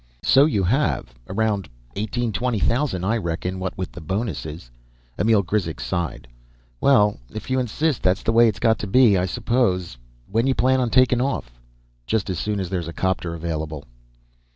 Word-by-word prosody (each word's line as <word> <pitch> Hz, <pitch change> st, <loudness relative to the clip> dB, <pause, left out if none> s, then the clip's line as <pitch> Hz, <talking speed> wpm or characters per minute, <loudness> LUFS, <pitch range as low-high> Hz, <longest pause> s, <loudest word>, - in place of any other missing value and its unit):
"So 135 Hz, +2 st, +6 dB
you 105 Hz, -11 st, 0 dB
have. 105 Hz, -, 0 dB, 0.2 s
Around 105 Hz, -3 st, -1 dB, 0.3 s
eighteen, 110 Hz, +3 st, -2 dB
twenty 125 Hz, 0 st, 0 dB
thousand, 115 Hz, -, 0 dB
I 110 Hz, +5 st, +1 dB
reckon, 90 Hz, -1 st, -3 dB
what 90 Hz, 0 st, -4 dB
with 95 Hz, -, -4 dB
the 85 Hz, -, -10 dB
bonuses." 80 Hz, -, -4 dB, 0.5 s
Emil 110 Hz, -2 st, +3 dB
Grizek 85 Hz, -, -2 dB
sighed. 85 Hz, -8 st, -3 dB, 0.5 s
"Well, 105 Hz, -7 st, +4 dB
if 110 Hz, +4 st, -7 dB
you 130 Hz, -, +2 dB
insist, 135 Hz, +4 st, -1 dB
that's 95 Hz, +2 st, +1 dB
the -, -, +1 dB
way 115 Hz, +1 st, +6 dB
it's 105 Hz, -4 st, -1 dB
got 110 Hz, +3 st, +2 dB
to 105 Hz, -, -4 dB
be, 115 Hz, 0 st, +5 dB
I 90 Hz, 0 st, +1 dB
suppose. 95 Hz, -, 0 dB, 0.3 s
When 115 Hz, +5 st, +1 dB
you 135 Hz, -, +2 dB
plan 130 Hz, +1 st, +3 dB
on 125 Hz, -2 st, +1 dB
taking 125 Hz, 0 st, +4 dB
off?" -, -, -3 dB, 0.5 s
"Just 100 Hz, -, 0 dB
as 90 Hz, -, -3 dB
soon 105 Hz, -1 st, -2 dB
as 95 Hz, -2 st, -4 dB
there's 90 Hz, -3 st, -2 dB
a 85 Hz, -, -6 dB
'copter 90 Hz, -2 st, -1 dB
available." 80 Hz, -3 st, -4 dB
100 Hz, 175 wpm, -23 LUFS, 90-120 Hz, 0.5 s, So